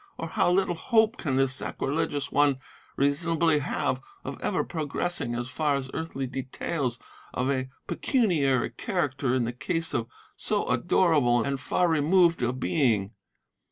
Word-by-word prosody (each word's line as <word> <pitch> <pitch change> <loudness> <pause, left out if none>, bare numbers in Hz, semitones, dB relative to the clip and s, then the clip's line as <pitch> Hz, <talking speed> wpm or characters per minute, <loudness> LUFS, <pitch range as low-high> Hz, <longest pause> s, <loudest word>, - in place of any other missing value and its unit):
or 165 - -5
how 175 - +2
little 185 -1 +2
hope 220 +6 +2
can 140 - -2
this 135 0 +2
sacrilegious 145 +2 -2
one 145 -2 +3 0.4
reasonably 160 +2 +2
have 135 -2 -1 0.2
of 130 - -6
ever 185 - 0
progressing 155 -4 -2
as 120 +1 -3
far 150 +2 0
as 135 -1 -4
earthly 160 -4 -3
details 130 0 -3 0.4
of 130 +2 +1
a 130 -1 -1 0.2
pecuniary 155 - +1
character 140 - -1
in 125 -2 +1
the 120 - -3
case 165 +6 -3
of 115 -1 -1 0.3
so - - -1
adorable 130 -9 +3
and 140 -1 -2
far 180 +6 +1
removed 165 +1 +3
a 120 0 +1
Being? 125 - +1
140 Hz, 145 wpm, -27 LUFS, 130-165 Hz, 0.4 s, one